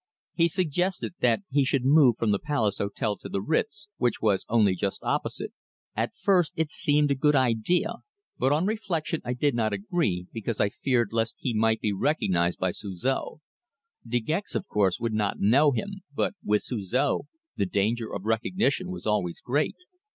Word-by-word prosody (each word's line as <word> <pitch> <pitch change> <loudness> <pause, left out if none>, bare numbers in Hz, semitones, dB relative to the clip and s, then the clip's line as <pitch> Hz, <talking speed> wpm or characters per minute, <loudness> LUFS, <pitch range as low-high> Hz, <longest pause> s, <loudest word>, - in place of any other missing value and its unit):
He 170 -1 +3
suggested 180 +2 -1
that 120 - +2
he 140 +1 +3
should 135 -1 0
move 135 -4 +6
from 110 -2 +1
the 100 - +1
Palace 120 -9 0
Hotel 100 +1 -1
to - - -9
the - - -1
Ritz, 200 - -1
which 120 -2 0
was 100 -3 +1
only 105 -4 +4
just 95 +2 -3
opposite. - - -2 0.4
At 115 +2 -2
first 185 -4 +2
it 160 -2 -1
seemed 145 0 +2
a - - +5
good 150 +2 +2
idea, 140 - +1 0.4
but 130 - +2
on 155 +5 +2
reflection 185 -7 -2
I 125 - -2
did 140 +3 +1
not 110 -3 0
agree, 100 - -1
because 115 0 -3
I 100 - +3
feared 120 -1 0
lest 115 0 0
he 125 - -2
might 110 0 +2
be 105 - 0
recognized 95 - +1
by 95 -1 0
Suzor. 110 - -3 0.6
De 120 +1 0
Gex, 160 - -3
of 190 - -2
course, 100 - +1
would 115 -1 -2
not 105 -2 0
know 135 +9 +5
him, 195 +9 -3
but 145 - -1
with 105 0 +1
Suzor 125 +5 0 0.4
the 100 - 0
danger 110 +4 0
of 100 0 -5
recognition 185 - 0
was 185 - -7
always 105 -5 0
great. 145 +5 0
120 Hz, 180 wpm, -27 LUFS, 105-155 Hz, 0.6 s, move